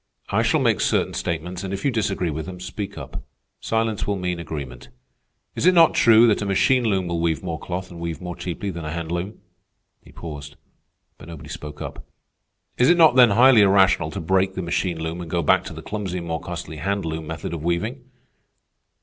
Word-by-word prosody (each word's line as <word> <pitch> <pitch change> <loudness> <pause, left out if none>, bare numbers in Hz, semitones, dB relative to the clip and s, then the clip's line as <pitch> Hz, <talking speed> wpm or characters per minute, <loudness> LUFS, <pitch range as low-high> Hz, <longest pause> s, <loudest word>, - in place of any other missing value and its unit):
I - - +2
shall - - +2
make - - +2
certain - - +1
statements, 85 +2 -4
and 95 - -4
if 100 0 -4
you 140 - +3
disagree 100 -7 -1
with 80 +1 -5
them, 90 -1 -8
speak 90 +3 -6
up. - - -7 0.4
Silence 110 -1 -1
will 100 - 0
mean 90 -2 -3
agreement. 70 -7 -7 0.6
Is - - 0
it 185 - +5
not 165 -2 +6
true 115 0 +6
that 110 -3 +2
a - - -2
machine 125 +6 +3
loom 95 -4 +1
will 85 -1 -2
weave 80 0 0
more 85 -3 -4
cloth 90 +1 -5
and 85 - -10
weave 85 -1 -4
more 90 -1 -6
cheaply 95 +3 -4
than 85 -2 -7
a 75 - -4
hand 85 0 -4
loom?" 90 +5 -4 0.6
He - - -18
paused, 75 -3 -8 0.6
but - - -12
nobody 85 -4 -10
spoke 75 -1 -7
up. - - -8 0.8
"Is 125 - +5
it 175 - +5
not 160 -6 +6
then 125 -2 +7
highly 120 +2 +6
irrational 95 -5 +4
to 100 - -5
break 95 +2 +1
the 95 - -3
machine 85 0 -1
loom 80 +2 -4
and 85 - -7
go 85 0 0
back - - +3
to - - -7
the - - -9
clumsy 100 -4 -4
and 85 - -5
more 80 -1 -3
costly 85 -2 -7
hand 100 +4 -2
loom 80 -1 -4
method 80 +1 -5
of 80 -3 -5
weaving?" 105 - -2
90 Hz, 215 wpm, -23 LUFS, 80-100 Hz, 0.8 s, then